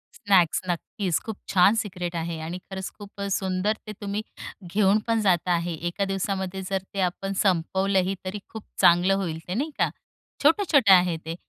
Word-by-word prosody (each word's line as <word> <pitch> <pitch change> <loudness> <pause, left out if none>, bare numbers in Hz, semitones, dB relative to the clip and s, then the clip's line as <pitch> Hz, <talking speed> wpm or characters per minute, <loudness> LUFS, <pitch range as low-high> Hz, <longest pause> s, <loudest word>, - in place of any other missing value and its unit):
Snacks, 190 -5 +3
नक्कीच. 175 +1 -1
खूप 220 -2 -4 0.2
छान 195 +3 +6
सिक्रेट 180 -5 -3
आहे 165 -1 -3
आणि 165 +3 -5
खरंच 190 -1 -5
खूपच 200 -1 -6
सुंदर 190 +2 0
ते - - -5
तुम्ही 205 +1 -2 0.5
घेऊन 205 0 +4
पण 225 -1 +2
जात 180 -3 +2
आहे. 170 -1 0
एका 175 +5 -2
दिवसामध्ये 195 -1 -2
जर 195 - 0
ते 195 - -4
आपण 195 +2 -5
संपवलंही, 190 +1 +1
तरी 190 +3 -4
खूप 220 -2 -8 0.2
चांगलं 175 +3 +5
होईल 170 -5 -3
ते, 180 - -3
नाही 290 +9 -2
का? - - +3 0.5
छोटं-छोटं 305 - +4
आहे 180 -2 +4
ते. 165 +1 -4
190 Hz, 165 wpm, -25 LUFS, 175-205 Hz, 0.5 s, छान